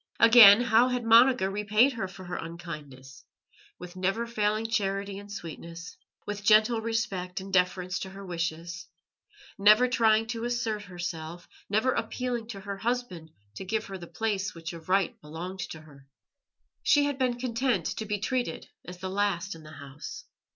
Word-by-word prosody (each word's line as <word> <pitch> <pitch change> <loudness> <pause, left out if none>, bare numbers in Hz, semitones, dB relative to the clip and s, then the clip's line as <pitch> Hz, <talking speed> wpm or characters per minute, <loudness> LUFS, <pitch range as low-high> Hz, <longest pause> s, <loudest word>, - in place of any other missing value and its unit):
Again, 230 -2 +9
how 240 0 +4
had 250 -1 -1
Monica 230 -2 +5
repaid 210 +6 +2
her 220 -5 -3
for 185 0 -11
her 175 - -5
unkindness? 150 -5 -9 0.5
With 180 0 -10
never 195 +5 -1
failing 215 -1 -1
charity 200 -3 -2
and 205 0 -12
sweetness, 170 -2 -8 0.3
with 205 -1 -5
gentle 220 +2 +4
respect 220 -6 -2
and 190 0 -9
deference 180 0 +1
to 190 - -6
her 195 +1 -10
wishes, 170 0 -4 0.7
never 215 +5 +6
trying 225 -3 +3
to 230 -1 -4
assert 230 -3 -2
herself, 175 -2 -6 0.2
never 220 +6 +2
appealing 245 -3 -3
to 200 -4 -8
her 200 0 -6
husband 225 -7 -3 0.3
to - - -5
give 215 +3 -2
her 195 - -7
the 170 - -9
place 200 -3 -2
which 165 0 -7
of 165 +1 -11
right 200 +4 +1
belonged 175 +5 -7
to 160 - -8
her. 140 -3 -17 0.7
She 290 - +4
had 285 -2 -2
been 250 -2 +1
content 250 +1 -1
to 220 - -3
be 210 0 -1
treated 245 -3 -3
as 180 +1 -9
the 185 +1 -5
last 195 -2 -1
in 165 - -12
the 155 - -13
house. 140 0 -9
200 Hz, 165 wpm, -28 LUFS, 175-230 Hz, 0.7 s, Again